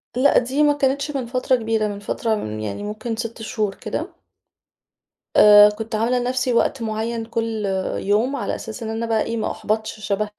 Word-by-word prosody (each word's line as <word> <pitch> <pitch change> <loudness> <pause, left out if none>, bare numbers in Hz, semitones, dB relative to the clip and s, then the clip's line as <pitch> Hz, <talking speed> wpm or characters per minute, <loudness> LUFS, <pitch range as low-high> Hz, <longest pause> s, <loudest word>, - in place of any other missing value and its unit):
لأ، 265 +3 +4
دي 265 +5 +2
ما 295 -1 +5
كانتش 280 +1 0
من 265 -3 -2
فترة 255 +2 +1
كبيرة، 225 -2 0
من 205 -1 -5
فترة 220 +2 -1
من 110 - -5
يعني 105 - -4
ممكن 215 +2 -4
6 230 0 -5
شهور 215 -2 -2
كده. - - -5 1.2
آآ، 210 0 +9
كنت 220 +1 -5
عاملة 235 +3 +1
لنفسي 250 0 0
وقت 250 +2 +1
معيّن 225 +1 -2
كل 225 -1 -2 0.3
يوم، 215 +7 +1
على 270 - -2
أساس 225 +1 -7
إن 220 - -4
أنا 225 +1 -2
بقى 230 0 0
ما 220 - -1
أُحبَطش 220 0 -3
شبه 210 0 -1
225 Hz, 180 wpm, -22 LUFS, 215-245 Hz, 1.2 s, آآ